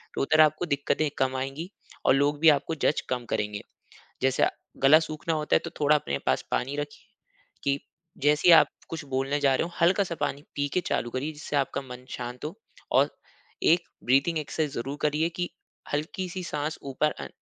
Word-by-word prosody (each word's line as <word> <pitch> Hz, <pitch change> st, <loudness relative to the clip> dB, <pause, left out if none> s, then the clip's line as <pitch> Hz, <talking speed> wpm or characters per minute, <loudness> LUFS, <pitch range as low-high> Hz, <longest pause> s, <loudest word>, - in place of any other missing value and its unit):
तो -, -, -1 dB
उधर 155 Hz, +3 st, +5 dB
आपको 155 Hz, +2 st, +3 dB
दिक्कतें 145 Hz, 0 st, 0 dB
कम 130 Hz, 0 st, +1 dB
आएगी 135 Hz, +6 st, -4 dB, 0.4 s
और -, -, +6 dB
लोग 145 Hz, +1 st, +2 dB
भी 160 Hz, +1 st, +7 dB
आपको 150 Hz, +2 st, +2 dB
जज 150 Hz, -, +3 dB
कम 125 Hz, -1 st, -2 dB
करेंगे। 105 Hz, 0 st, -2 dB, 0.6 s
जैसे 130 Hz, 0 st, +2 dB
अ, -, -, +2 dB, 0.3 s
गला 140 Hz, +3 st, +7 dB
सूखना 160 Hz, 0 st, -3 dB
होता 150 Hz, -1 st, +2 dB
है -, -, +3 dB
तो 170 Hz, -, -4 dB
थोड़ा 150 Hz, +1 st, +5 dB
अपने 70 Hz, -, -2 dB
पास -, -, +2 dB
पानी 140 Hz, +3 st, 0 dB
रखिए, 145 Hz, 0 st, -6 dB, 0.6 s
कि 140 Hz, 0 st, +2 dB, 0.4 s
जैसे 150 Hz, +4 st, +4 dB
ही -, -, +10 dB
आप -, -, +7 dB, 0.2 s
कुछ 160 Hz, -1 st, -5 dB
बोलने 135 Hz, +2 st, -1 dB
जा 140 Hz, -2 st, +4 dB
रहे -, -, +1 dB
हो 175 Hz, -, -8 dB
हल्का-सा 180 Hz, +1 st, +3 dB
पानी 140 Hz, -, -1 dB
पी 145 Hz, 0 st, 0 dB
के 180 Hz, -, +3 dB
चालू 120 Hz, -, 0 dB
करिए 140 Hz, +6 st, -3 dB
जिससे 150 Hz, -1 st, -5 dB
आपका 140 Hz, 0 st, 0 dB
मन 125 Hz, 0 st, -9 dB
शांत 125 Hz, 0 st, -6 dB
हो 155 Hz, -, -4 dB, 0.4 s
और -, -, +4 dB, 0.6 s
एक 175 Hz, 0 st, +1 dB, 0.2 s
ब्रीथिंग 140 Hz, +6 st, +3 dB
एक्सरसाइज़ 150 Hz, -1 st, -2 dB
ज़रूर 140 Hz, +4 st, -5 dB
करिए 150 Hz, +2 st, +2 dB
कि 175 Hz, -, -1 dB, 0.4 s
हल्की-सी 180 Hz, +5 st, -3 dB
साँस 150 Hz, -1 st, -3 dB
ऊपर 150 Hz, +3 st, +1 dB
अं -, -, -5 dB
145 Hz, 195 wpm, -27 LUFS, 135-155 Hz, 0.6 s, ही